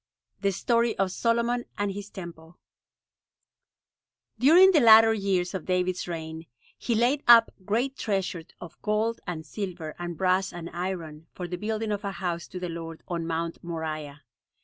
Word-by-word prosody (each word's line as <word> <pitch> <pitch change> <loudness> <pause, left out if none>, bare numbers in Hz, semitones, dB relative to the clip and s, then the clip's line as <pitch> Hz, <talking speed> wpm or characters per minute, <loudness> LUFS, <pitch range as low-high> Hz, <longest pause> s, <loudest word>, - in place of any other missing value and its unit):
THE 200 0 +1
STORY 235 +4 +1
OF 195 -1 +1
SOLOMON 235 +3 0
AND 205 -1 -1
HIS 200 +1 -7
TEMPLE 170 -3 -10 1.8
During 345 +9 +7
the 330 - +5
later 225 -2 +8
years 195 -4 0
of 190 -4 -5
David's 180 0 0
reign, 160 -1 -6 0.3
he 235 - -2
laid 250 +6 +2
up 230 -1 +8
great 245 +6 -1
treasure 190 -6 -2
of 175 -2 -11
gold 220 +2 0
and 160 -3 -5
silver, 170 -2 -5
and 175 -1 -5
brass, 185 +2 +1
and 175 -1 -8
iron, 170 -3 -5
for 180 - -5
the 180 - -4
building 215 +3 -3
of 205 +1 -3
a 200 -1 -3
house 175 -1 -3
to 180 - -7
the 180 - -4
Lord 165 -1 -7
on 170 -2 -3
Mount 165 0 -3
Moriah. 155 -3 -5
185 Hz, 160 wpm, -27 LUFS, 170-220 Hz, 1.8 s, later